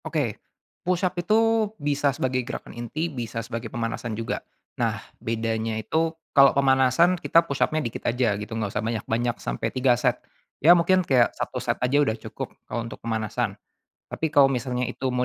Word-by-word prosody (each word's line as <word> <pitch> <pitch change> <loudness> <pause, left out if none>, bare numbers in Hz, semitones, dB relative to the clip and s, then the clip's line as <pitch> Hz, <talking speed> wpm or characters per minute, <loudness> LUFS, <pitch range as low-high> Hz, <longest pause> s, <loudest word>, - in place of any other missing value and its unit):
Oke, - - -2 0.4
push-up 185 0 0
itu 220 +2 +3
bisa 145 -1 +1
sebagai 130 -1 0
gerakan 125 +1 -7
inti 120 +7 -3
bisa 115 -2 -4
sebagai 115 -1 -5
pemanasan 115 -1 -3
juga. 115 - -3 0.4
Nah, - - +1 0.2
bedanya 110 0 -1
itu 160 +9 -1 0.2
kalau 140 -1 +6
pemanasan 135 +6 +4
kita 165 - +4
push-up-nya 150 +2 0
dikit 115 - -2
aja 120 -2 +1
gitu, 110 +2 -5
gak 105 -3 -2
usah 105 - -1
banyak-banyak 115 +1 -1
sampai - - -3
3 130 -1 +3
set. 120 - +1 0.4
Ya 165 +5 +8
mungkin 185 +2 +3
kayak 125 -5 +3
1 - - -3
set - - -1
aja 135 +3 +2
udah 115 -6 +1
cukup - - -7 0.2
kalau 120 - -2
untuk - - -9
pemanasan. 110 -2 -2 0.6
Tapi 160 - -1
kalau 145 -3 +5
misalnya 125 0 -1
itu 130 - -3
mau 125 0 0
125 Hz, 170 wpm, -25 LUFS, 115-155 Hz, 0.6 s, Ya